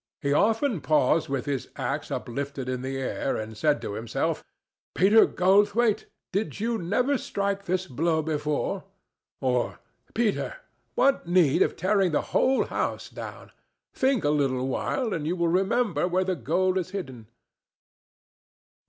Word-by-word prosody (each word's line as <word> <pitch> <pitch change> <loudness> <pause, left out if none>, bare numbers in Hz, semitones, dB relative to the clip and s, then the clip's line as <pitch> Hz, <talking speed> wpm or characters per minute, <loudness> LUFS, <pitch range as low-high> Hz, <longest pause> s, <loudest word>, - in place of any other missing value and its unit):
He 140 -1 0
often 220 - +2
paused 155 0 +2
with 135 -2 -2
his 140 -3 -2
axe - - -3
uplifted 140 +1 -4
in 130 -1 -2
the 135 +1 -3
air, 135 +1 -2
and 110 0 -6
said 150 +6 +2
to - - -4
himself, 110 +1 -2 0.5
"Peter 205 +5 +6
Goldthwaite, 205 +4 +3 0.3
did 205 +1 -2
you 230 +1 -1
never 250 +10 +1
strike 200 -1 -2
this 185 +1 0
blow 160 +2 0
before?" 150 -1 -1 0.6
or 125 -2 0 0.4
"Peter, 230 - 0 0.4
what 275 -10 +2
need 175 -5 +4
of - - +3
tearing 190 -1 +2
the - - +2
whole 265 +1 +3
house - - -3
down? - - -9 0.4
Think 260 -4 +1
a 145 - +2
little 135 -3 +1
while, 225 - -1
and 155 -3 -2
you 175 - 0
will 170 -1 +1
remember 195 +3 +1
where 185 +1 +1
the 185 0 -1
gold 180 +7 +1
is 180 - -4
hidden." 135 - -6
175 Hz, 145 wpm, -26 LUFS, 140-205 Hz, 0.6 s, Peter